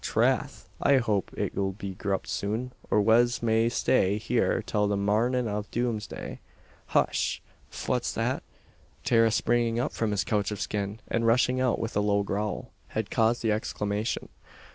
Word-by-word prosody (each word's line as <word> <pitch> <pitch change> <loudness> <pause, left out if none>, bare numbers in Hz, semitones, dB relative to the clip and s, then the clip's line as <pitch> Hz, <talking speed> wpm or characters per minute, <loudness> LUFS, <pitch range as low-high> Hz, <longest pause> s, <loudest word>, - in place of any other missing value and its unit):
Trath! - - 0
I 140 -1 +5
hope 105 -6 0
it'll 95 -1 -1
be 100 -1 -6
grupped 95 +1 -2
soon, 110 +5 -2 0.2
or 105 - +3
wez 120 +3 +3
may 115 0 +3
stay 105 -5 +2
here 110 - +1
till 105 -1 +1
the 100 0 0
marnin' 115 +5 +1
av 105 0 -3
doomsday. 115 -4 -3 0.5
Hush! - - +1 0.3
fwhat's - - -1
that?" - - 0 0.6
Tara 115 -1 +4
springing 115 +1 +1
up 125 - 0
from 115 - -1
his 105 -1 0
couch 105 -2 0
of 105 -2 -4
skin, 100 +1 -3
and 115 0 0
rushing 125 +2 +3
out 125 -2 +2
with 115 - -4
a 105 - +3
low 100 0 +2
growl, 100 0 -3 0.2
had 110 -1 -3
caused 115 +1 +2
the 110 - +2
exclamation. 105 0 -2
110 Hz, 160 wpm, -28 LUFS, 105-120 Hz, 0.6 s, I